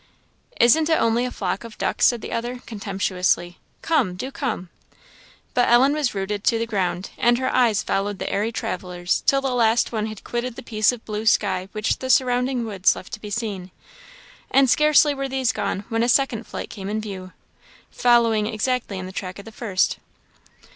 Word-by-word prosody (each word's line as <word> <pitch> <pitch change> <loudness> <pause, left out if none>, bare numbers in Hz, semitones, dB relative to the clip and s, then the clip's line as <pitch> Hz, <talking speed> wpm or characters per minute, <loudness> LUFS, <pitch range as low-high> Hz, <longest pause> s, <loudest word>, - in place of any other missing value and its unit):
"Isn't 310 +7 +5
it 320 - +4
only 230 +2 +2
a 250 - -3
flock 195 -1 -3
of 230 -2 -11
ducks," - - +2
said 240 -2 +1
the - - -7
other, 240 +2 -3
contemptuously; 190 -4 -1 0.2
"come! 260 - +1
do 260 +9 -5
come!" 225 - -3 0.8
But 245 - +3
Ellen 255 +4 +5
was 295 -7 -1
rooted 200 +1 -3
to 230 - +3
the 230 - -1
ground, 185 -4 -2
and 240 0 +4
her 260 +1 -1
eyes 235 -5 +3
followed 200 +1 -1
the - - -4
airy 215 +3 -1
travellers 180 -4 -2
till 275 0 +4
the 270 -2 -1
last 230 -1 +2
one 220 -2 -2
had 215 -2 -8
quitted 240 0 -3
the - - -9
piece 215 -1 +2
of 245 -2 -9
blue 215 +1 -4
sky 190 -4 +2
which 215 0 -1
the 260 - -5
surrounding 250 -1 +2
woods 200 -4 +2
left - - -11
to 210 - -6
be 210 - -7
seen. 205 -4 -4 0.8
And 270 -2 +4
scarcely 300 -1 +5
were 275 -1 -4
these 265 -2 +1
gone 200 -1 -3
when 225 0 0
a 240 - +2
second 240 -4 +1
flight - - -6
came 195 -1 -6
in 215 +1 -1
view, 190 -4 -7 0.6
following 230 -3 +3
exactly 225 -1 -2
in 185 - -5
the 185 - -7
track 185 -1 -6
of 200 - -10
the 225 - -10
first. 205 -4 0
225 Hz, 195 wpm, -23 LUFS, 200-245 Hz, 0.8 s, Isn't